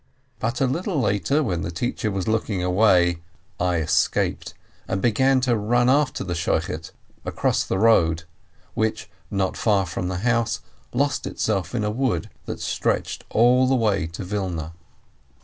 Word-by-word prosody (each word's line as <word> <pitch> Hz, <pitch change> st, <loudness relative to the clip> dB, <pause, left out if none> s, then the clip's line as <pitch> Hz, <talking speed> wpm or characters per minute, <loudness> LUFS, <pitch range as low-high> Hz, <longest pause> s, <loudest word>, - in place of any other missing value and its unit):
But 115 Hz, +4 st, -2 dB
a -, -, +4 dB
little 165 Hz, +5 st, -1 dB
later, 120 Hz, +7 st, +1 dB
when 90 Hz, -9 st, -1 dB
the 85 Hz, -, -3 dB
teacher 110 Hz, +5 st, -2 dB
was 95 Hz, -1 st, -3 dB
looking 110 Hz, -4 st, 0 dB
away, 90 Hz, -2 st, +3 dB, 0.4 s
I 90 Hz, 0 st, +1 dB
escaped 80 Hz, -2 st, 0 dB, 0.3 s
and 95 Hz, -, -1 dB
began 130 Hz, +5 st, +3 dB
to 125 Hz, -2 st, +2 dB
run 120 Hz, +4 st, +2 dB
after 140 Hz, -1 st, +1 dB
the 90 Hz, -2 st, -3 dB
Shochet 80 Hz, -2 st, -2 dB, 0.3 s
across -, -, 0 dB
the -, -, -2 dB
road, 85 Hz, -7 st, +3 dB, 0.5 s
which, 110 Hz, -1 st, -2 dB, 0.2 s
not 95 Hz, -1 st, -1 dB
far 100 Hz, -4 st, +2 dB
from 90 Hz, +1 st, -4 dB
the 90 Hz, -1 st, -2 dB
house, 115 Hz, -1 st, +1 dB, 0.3 s
lost 140 Hz, 0 st, 0 dB
itself 100 Hz, -1 st, -2 dB
in 110 Hz, -, 0 dB
a 105 Hz, -, 0 dB
wood 120 Hz, -, -1 dB, 0.2 s
that -, -, -4 dB
stretched -, -, -2 dB
all 125 Hz, +3 st, +4 dB
the 130 Hz, -, +3 dB
way 105 Hz, -8 st, +1 dB
to 85 Hz, +3 st, -7 dB
Wilna. 90 Hz, -5 st, -3 dB
105 Hz, 155 wpm, -23 LUFS, 90-120 Hz, 0.5 s, a